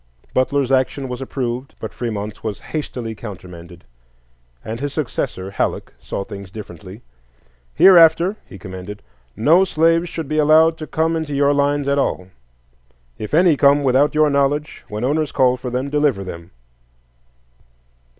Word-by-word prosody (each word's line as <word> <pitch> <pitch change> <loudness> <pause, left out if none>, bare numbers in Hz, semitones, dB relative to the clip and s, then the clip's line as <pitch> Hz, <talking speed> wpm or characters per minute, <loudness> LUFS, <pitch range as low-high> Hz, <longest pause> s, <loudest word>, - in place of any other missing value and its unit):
Butler's 135 +1 +1
action 135 +1 +1
was 125 +1 -5
approved, 130 -1 -4
but - - -6
Fremont's 105 -3 -5
was 110 -3 -4
hastily 125 -7 -5
countermanded, 90 -5 -10 0.8
and 115 +1 -5
his 145 +1 -4
successor, 100 -9 -3
Halleck, - - -2
saw 100 - -5
things 100 -2 -9
differently. 95 +1 -10 0.7
"Hereafter," 170 +1 +6
he - - -11
commanded, 95 0 -9 0.3
"no 160 - +4
slaves 165 -1 +2
should 165 -3 -5
be 155 +2 -1
allowed 160 +2 +5
to 155 - -6
come 160 +1 0
into 155 -3 -3
your 140 +1 +3
lines 145 0 +1
at 140 0 +2
all; 90 -8 -2 0.9
if 110 +7 -3
any 170 -1 +5
come 140 +1 +4
without 135 +3 +2
your 155 -1 +4
knowledge, 140 +2 0
when 105 -1 -5
owners 150 +3 0
call 125 -1 +3
for 125 0 -6
them 130 +3 -3
deliver 145 -9 +1
them." 85 -2 -9
135 Hz, 145 wpm, -19 LUFS, 105-150 Hz, 0.9 s, Hereafter